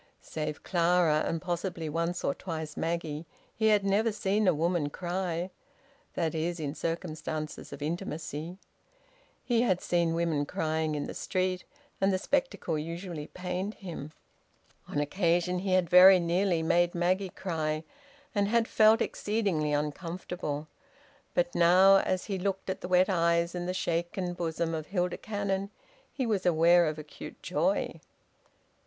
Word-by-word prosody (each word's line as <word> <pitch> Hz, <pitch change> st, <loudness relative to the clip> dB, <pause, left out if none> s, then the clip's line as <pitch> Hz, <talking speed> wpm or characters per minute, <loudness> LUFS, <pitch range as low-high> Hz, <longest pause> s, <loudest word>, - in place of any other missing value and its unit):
Save 155 Hz, -1 st, -4 dB
Clara, 170 Hz, -3 st, +3 dB
and 165 Hz, -, -1 dB
possibly 175 Hz, -1 st, -3 dB
once 170 Hz, +3 st, -2 dB
or 140 Hz, -, +1 dB
twice 160 Hz, -3 st, -6 dB
Maggie, 165 Hz, -1 st, -3 dB, 0.3 s
he 220 Hz, -, +2 dB
had 210 Hz, -2 st, +4 dB
never 210 Hz, +3 st, +2 dB
seen 205 Hz, 0 st, 0 dB
a -, -, +7 dB
woman 165 Hz, -1 st, 0 dB
cry 180 Hz, +1 st, -3 dB, 0.6 s
that 165 Hz, -3 st, 0 dB
is, 170 Hz, +2 st, -2 dB
in 145 Hz, -2 st, -3 dB
circumstances 155 Hz, -2 st, -4 dB
of 140 Hz, +1 st, -7 dB
intimacy; 160 Hz, 0 st, -4 dB, 0.9 s
he 235 Hz, -2 st, +2 dB
had 185 Hz, -7 st, +2 dB
seen 170 Hz, -2 st, +1 dB
women 160 Hz, -4 st, 0 dB
crying 155 Hz, 0 st, -1 dB
in 145 Hz, -, -2 dB
the -, -, -6 dB
street, 185 Hz, -1 st, -1 dB, 0.4 s
and 195 Hz, +1 st, +4 dB
the 190 Hz, -, +2 dB
spectacle 205 Hz, -, -1 dB
usually 165 Hz, -1 st, -5 dB
pained 185 Hz, +3 st, -4 dB
him. 165 Hz, -6 st, -7 dB, 0.8 s
On 145 Hz, -, -2 dB
occasion 175 Hz, +3 st, +1 dB
he 190 Hz, 0 st, -1 dB
had 185 Hz, -2 st, +3 dB
very 185 Hz, +2 st, +9 dB
nearly 170 Hz, 0 st, +1 dB
made 175 Hz, +2 st, +2 dB
Maggie 185 Hz, +2 st, +1 dB
cry, 160 Hz, -4 st, -2 dB, 0.5 s
and 200 Hz, -2 st, +2 dB
had 230 Hz, +1 st, +2 dB
felt 220 Hz, +1 st, +5 dB
exceedingly 195 Hz, -9 st, -1 dB
uncomfortable. 150 Hz, 0 st, -3 dB, 0.7 s
But -, -, +1 dB
now, 185 Hz, +3 st, +6 dB
as 185 Hz, -1 st, 0 dB
he 195 Hz, -3 st, -3 dB
looked 195 Hz, 0 st, -2 dB
at -, -, -6 dB
the -, -, -4 dB
wet 185 Hz, 0 st, +4 dB
eyes 170 Hz, -2 st, +2 dB
and 175 Hz, 0 st, -3 dB
the -, -, 0 dB
shaken 175 Hz, +1 st, -1 dB
bosom 165 Hz, -1 st, -2 dB
of 155 Hz, -1 st, -4 dB
Hilda 180 Hz, -2 st, -1 dB
Cannon, 200 Hz, -2 st, -2 dB, 0.4 s
he 260 Hz, -, -2 dB
was 210 Hz, -5 st, 0 dB
aware 170 Hz, 0 st, +5 dB
of 155 Hz, 0 st, -2 dB
acute 150 Hz, -1 st, -10 dB
joy. -, -, 0 dB
175 Hz, 150 wpm, -29 LUFS, 160-190 Hz, 0.9 s, very